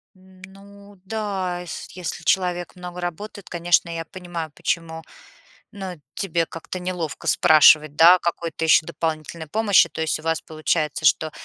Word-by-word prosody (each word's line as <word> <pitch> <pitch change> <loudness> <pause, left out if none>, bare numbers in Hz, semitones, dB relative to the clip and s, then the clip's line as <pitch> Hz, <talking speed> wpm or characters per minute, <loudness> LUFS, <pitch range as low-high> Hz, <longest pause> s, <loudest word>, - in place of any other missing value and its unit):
Ну 195 +2 -16
да, 195 -4 -3
ес 175 - -7
если 180 -2 -6
человек 180 -1 0
много 180 0 -8
работает, 180 +3 -6
конечно, 175 0 +2
я 165 -1 -4
понимаю, 170 -2 -7
почему, 165 +1 -3 0.7
ну, 190 -5 -7
тебе 170 -4 -1
как-то 165 +3 -7
неловко 180 -4 -5
спрашивать, 155 -1 +5
да, 170 +2 +8
о - - +1
какой-то 170 -1 -3
ещё 160 0 +5
дополнительной 160 -1 -4
помощи. 210 +2 +4
То - - -7
есть 160 - -1
у - - -13
вас 165 0 -1
получается, 155 0 -2
что, 155 +3 +3
175 Hz, 145 wpm, -22 LUFS, 160-185 Hz, 0.7 s, да